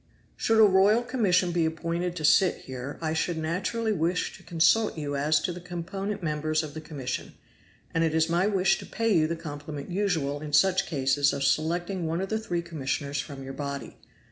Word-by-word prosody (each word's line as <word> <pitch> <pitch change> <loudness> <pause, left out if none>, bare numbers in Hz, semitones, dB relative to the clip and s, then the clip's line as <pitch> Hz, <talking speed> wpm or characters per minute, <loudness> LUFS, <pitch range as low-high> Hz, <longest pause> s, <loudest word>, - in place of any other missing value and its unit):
"Should 225 - +1
a - - +9
royal 200 +4 +4
commission 190 -8 +2
be 170 -1 +1
appointed 170 +2 -2
to 155 -4 -2
sit 185 +4 +5
here, 130 +2 -6
I 160 0 0
should 165 +1 -1
naturally 185 +8 -1
wish 175 -1 0
to - - -15
consult 175 +5 +2
you 145 -2 -3
as 150 +2 +2
to 175 - -2
the 175 - -8
component 195 +3 -5
members 155 0 0
of 150 -2 -7
the 160 - -6
commission; 135 -5 -5 0.6
and 165 - +2
it 160 -1 +1
is 160 0 +3
my 175 +3 +2
wish 195 -2 +2
to - - -9
pay 225 0 0
you 155 -1 +4
the 170 - -2
compliment 145 -1 -7
usual 165 -7 0
in 150 -1 -7
such 190 +5 +4
cases 140 -1 +2
of 140 - -2
selecting 170 +5 0
one 165 +2 -1
of 190 +1 -3
the 220 - 0
three 175 -6 -2
commissioners 145 -3 -3
from 140 -2 -9
your 135 0 -7
body. 140 -1 -5
165 Hz, 200 wpm, -27 LUFS, 150-185 Hz, 0.6 s, a